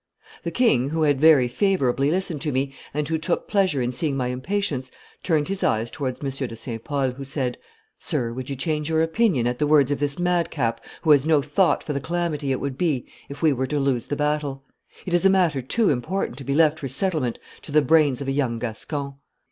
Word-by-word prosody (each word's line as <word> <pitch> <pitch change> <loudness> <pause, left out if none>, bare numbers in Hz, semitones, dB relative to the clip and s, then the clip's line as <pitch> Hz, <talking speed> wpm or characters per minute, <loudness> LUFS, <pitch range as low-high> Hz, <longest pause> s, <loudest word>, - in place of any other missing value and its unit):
The - - -2
king, 140 - +2
who 160 +1 0
had 145 -2 +2
very 155 -6 +6
favorably 140 -4 +1
listened 175 -3 -1
to 150 -1 -1
me, 135 +1 -1 0.2
and 150 0 -2
who 160 0 -1
took 170 +2 -1
pleasure 185 -10 +1
in 120 - -1
seeing 140 +2 -2
my 125 -2 -1
impatience, 130 -1 -2 0.3
turned 155 -4 +1
his 195 0 -3
eyes 110 +1 +1
towards 130 -4 -4
M. 135 -1 -2
de 115 - -7
St. 115 0 -7
Pol, 140 -4 0
who 135 +2 -8
said, 135 -2 -2 0.4
'Sir, 115 -1 -2
would 130 +2 -6
you 140 - -3
change 150 +3 -2
your 160 0 +2
opinion 165 - +1
at 120 0 -1
the 150 - +2
words 145 -2 +4
of 145 - 0
this 145 -1 -1
madcap, 165 -10 0 0.2
who 160 - +4
has 145 0 +5
no 155 -2 +5
thought 160 +5 +2
for 150 - -3
the 140 - -2
calamity 160 -4 -2
it 130 - 0
would 135 -1 -4
be 155 -8 0 0.2
if 140 +3 -8
we 155 -3 +5
were 130 0 -2
to 150 +1 -1
lose 135 -4 0
the 145 - -2
battle? 150 -2 -1 0.4
It 180 - -4
is 175 - +3
a 195 - +6
matter 175 -8 +2
too 205 - +1
important 140 +1 -2
to - - -7
be 140 +2 -1
left 155 0 +4
for 135 - -4
settlement 140 -3 0 0.2
to - - -10
the 150 0 +4
brains 150 -5 +3
of 140 - -4
a - - +1
young 135 -4 0
Gascon. 135 +5 -4
145 Hz, 230 wpm, -23 LUFS, 130-160 Hz, 0.4 s, very